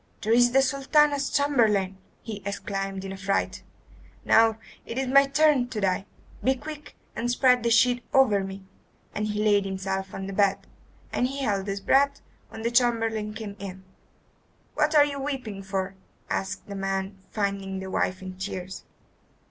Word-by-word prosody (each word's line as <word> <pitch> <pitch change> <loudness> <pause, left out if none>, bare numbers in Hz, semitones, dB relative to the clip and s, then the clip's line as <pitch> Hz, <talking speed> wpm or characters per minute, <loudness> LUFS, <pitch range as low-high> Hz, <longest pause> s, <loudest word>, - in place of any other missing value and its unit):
"There 220 +2 +2
is 245 0 +5
the 270 +1 +5
Sultana's 280 +1 +2
chamberlain," 215 -10 +2 0.2
he 215 -3 -6
exclaimed 195 -1 -4
in 190 - -5
a 195 - -6
fright. 195 +1 -1 0.6
"Now 225 -1 +5 0.3
it 230 - -7
is 265 - 0
my 275 +2 +5
turn 295 -3 +3
to 225 - -4
die. 195 0 0 0.4
Be 265 +1 +3
quick 300 +2 -9 0.2
and 240 - -2
spread 250 0 +4
the 235 - +1
sheet 240 +1 +4
over 215 -7 +4
me." 195 0 -7 0.5
And 210 0 -2
he 210 0 -1
laid 205 -2 +4
himself 190 0 -3
on 195 - -5
the 195 - -5
bed, 195 0 +2 0.5
and 250 - +1
held 220 -8 -2
his 195 0 -3
breath 280 +6 +3 0.3
when 220 - -8
the 235 - 0
chamberlain 225 -3 +1
came 210 -3 -6
in. 190 -1 -8 0.9
"What 300 +1 +1
are 290 -1 +8
you 280 -1 -4
weeping 255 -8 -4
for?" 190 0 -3 0.4
asked 190 -1 -3
the 200 - -8
man, 195 0 -3
finding 200 -2 -2
the 190 0 -6
wife 185 +1 -1
in 185 0 -8
tears. 190 -1 -5
210 Hz, 165 wpm, -26 LUFS, 195-260 Hz, 0.9 s, are